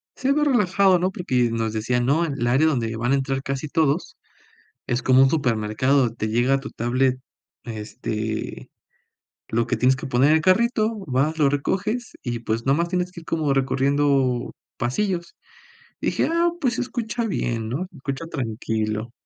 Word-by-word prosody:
se 270 +1 0
ve 295 +1 +2
relajado, 200 -8 +3
¿no?". 185 +2 0
Porque 125 -10 0
nos 115 -1 -1
decían: 120 +3 0
"No, 155 +6 +2
el 140 -6 -2
área 135 +6 +4
donde 115 -7 0
van 120 +3 0
a 140 - +5
entrar 135 0 -1
casi 135 +2 -3
todos 155 +1 0 0.7
es 120 +2 -1
como 130 0 +5
un 135 - +5
supermercado, 125 -1 +1
te 110 -2 -3
llega 120 +4 +2
a 135 - +1
tu 140 - -8
tablet, 130 +2 0 0.5
este, 110 -1 -5 0.8
lo 115 0 0
que - - 0
tienes 130 +1 +3
que 145 0 -6
poner 130 +3 +3
en 155 - +6
el 160 - +1
carrito, 220 +4 +2
vas, 140 +5 0
lo 145 -3 +4
recoges 205 - -1
y, 120 -1 -3
pues, 115 0 -2
nomás 160 +6 +2
tienes 180 0 -1
que 170 - -9
ir 165 - -17
como 155 -4 0
recorriendo 135 -1 +1 0.3
pasillos". 170 +7 -2 0.6
Dije: - - 0
"Ah, 340 +1 +3
pues 250 -5 +1
se - - -2
escucha 235 -2 -3
bien, 115 - -2
¿no?, 145 +10 -3
se 170 - -17
escucha 140 +3 -5
tranquilo". 110 -5 -3
135 Hz, 175 wpm, -23 LUFS, 120-170 Hz, 0.8 s, en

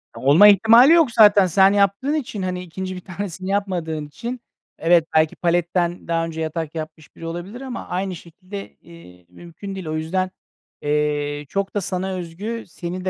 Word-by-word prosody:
Olma 150 +10 +6
ihtimali 225 - +7
yok 325 -7 +4
zaten. 205 -3 +6
Sen 190 +3 +4
yaptığın 200 +8 +1
için, 250 -9 -3
hani, 180 -1 -3
2. 185 +2 -6
bir 180 - -8
tanesini 185 0 -6
yapmadığın 175 -6 -2
için 235 +11 -6 0.4
evet, 170 0 +3
belki 155 0 +3
paletten 175 0 -1
daha 165 0 0
önce 160 -1 -6
yatak 160 0 -4
yapmış 155 -1 -8
biri 165 - -10
olabilir 175 +9 -6
ama 260 -2 -7
aynı 185 +1 -3
şekilde, 185 +4 -10
eee, 90 - -16
mümkün 175 - -10
değil. 190 -3 -7
O 155 - -3
yüzden, 185 +4 -2 0.5
eee, 145 0 -1
çok 195 0 -3
da 205 - 0
sana 190 +1 -3
özgü, 190 +7 -5
seni 180 +1 -6
de - - +1
180 Hz, 170 wpm, -21 LUFS, 165-200 Hz, 0.5 s, ihtimali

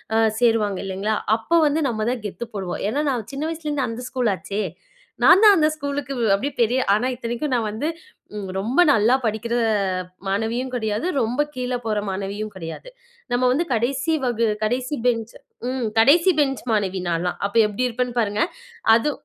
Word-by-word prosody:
அ - - +4 0.2
சேருவாங்க, 225 -5 +2
இல்லைங்களா? 200 +3 -1 0.2
அப்போ 335 +9 +1
வந்து 305 +2 +1
நம்ம 215 -2 -2
தான் 240 -4 -4
கெத்து 230 +4 -7
போடுவோம். 190 -3 -4
ஏன்னா 290 +6 0
நான் 235 -5 -4
சின்ன 275 +2 -3
வயசுல 325 -2 -5
இருந்து 275 -4 0
அந்த 230 +2 -6
ஸ்கூல் 250 -5 0
ஆச்சே. 205 +3 -4 0.6
நான் 360 - +7
தான் 415 -2 +9
அந்த 310 -2 +4
ஸ்கூலுக்கு 285 -2 -4 0.2
அப்படியே 270 +8 -1
பெரிய 240 +3 +3
ஆனா 215 +5 +1
இத்தனைக்கும் 240 +4 -3
நான் 235 -3 +1
வந்து, 230 +9 -3 0.7
ரொம்ப 235 - +2
நல்லா 230 +1 +4
படிக்கிற 225 +2 -1 0.7
மாணவியும் 225 +6 -1
கெடையாது, 220 +4 -1
ரொம்ப 240 +6 0
கீழ 250 0 -2
போற 215 -1 0
மாணவியும் 200 +2 -4
கெடையாது. 165 - -8 0.4
நம்ம 245 +1 +1
வந்து 310 +7 +1
கடைசி 270 +7 0
வகு 235 -2 +1 0.2
கடைசி 250 +6 -1
பெஞ்ச் 230 -2 0 0.4
ம். 255 -3 -2
கடைசி 335 +10 +6
பெஞ்ச் 270 -5 +1
மாணவி 195 -3 0
நான்லாம். 170 +1 -1
அப்ப 200 - -15
எப்படி 250 +5 -1
இருப்பேன்னு 245 0 -3
பாருங்க. 210 -1 0 0.5
அது 235 +6 +1
235 Hz, 165 wpm, -22 LUFS, 215-270 Hz, 0.7 s, தான்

